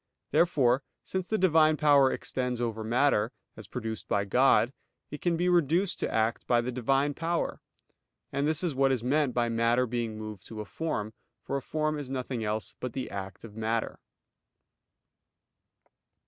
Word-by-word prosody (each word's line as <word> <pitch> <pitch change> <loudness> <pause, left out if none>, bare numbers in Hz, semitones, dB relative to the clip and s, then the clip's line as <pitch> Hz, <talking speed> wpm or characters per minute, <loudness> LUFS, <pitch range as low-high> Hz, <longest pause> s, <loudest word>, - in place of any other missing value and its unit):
Therefore, 135 -7 +3 0.2
since 185 -1 -3
the 220 - +1
Divine 155 -4 +4
power 145 -3 +5
extends 125 -2 -2
over 115 -2 -2
matter, 115 -1 +2 0.2
as 110 -3 -10
produced 110 -2 -5
by 100 0 +1
God, 125 +3 +4 0.4
it 150 - -7
can 175 -2 +1
be 175 +2 +1
reduced 175 +2 +2
to - - -2
act 110 +1 0
by 120 - +4
the 120 +2 -2
Divine 135 +4 +1
power: 170 +3 -2 0.7
and 140 +2 +1
this 155 +2 +1
is 170 -4 0
what 135 0 +3
is 125 -4 0
meant 140 0 +1
by 120 -1 +2
matter 115 +2 +2
being 120 -2 -3
moved 110 -3 -8
to 110 - -8
a 105 - -4
form; 110 - -3 0.3
for - - -3
a 140 - -1
form 155 +1 -1
is 140 -3 -6
nothing 130 -3 -3
else 110 +1 -2
but 125 -2 -4
the 130 - -4
act 95 -1 -6
of 110 -3 -11
matter. 110 +1 -2
125 Hz, 170 wpm, -29 LUFS, 115-150 Hz, 0.7 s, power